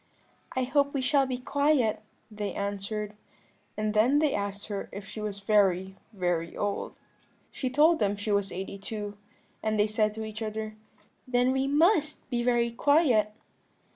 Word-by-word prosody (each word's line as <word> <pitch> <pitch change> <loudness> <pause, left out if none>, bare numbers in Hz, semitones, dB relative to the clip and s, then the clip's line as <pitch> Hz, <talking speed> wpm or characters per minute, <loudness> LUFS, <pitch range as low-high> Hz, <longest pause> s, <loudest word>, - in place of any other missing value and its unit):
"'I 260 - +1
hope 280 +2 +2
we 275 - +1
shall 275 0 +3
be 255 -1 -2
quiet,' 280 -3 +1 0.3
they 210 -1 -4
answered; 205 +1 -3 0.6
and 215 0 -1
then 235 +7 +4
they 295 -2 +2
asked 200 0 -2
her 205 -2 -5
if 200 0 -8
she 215 - -7
was 205 -1 -4
very, 190 -2 +2 0.2
very 175 -4 -2
old. 205 -1 -2 0.6
"She 260 - -2
told 310 +5 +4
them 205 -1 +1
she 205 +1 -3
was 200 -1 +1
eighty 195 +2 -5
two; 205 0 -5 0.5
and 215 -1 0
they 205 - +5
said 215 0 +1
to 220 0 -4
each 215 +1 -7
other, 215 0 -4 0.5
'Then 250 0 +2
we 265 +1 +1
must 305 +1 +2
be 240 -1 +1
very 240 -1 +2
quiet.' 250 -5 +3
215 Hz, 165 wpm, -28 LUFS, 205-260 Hz, 0.6 s, they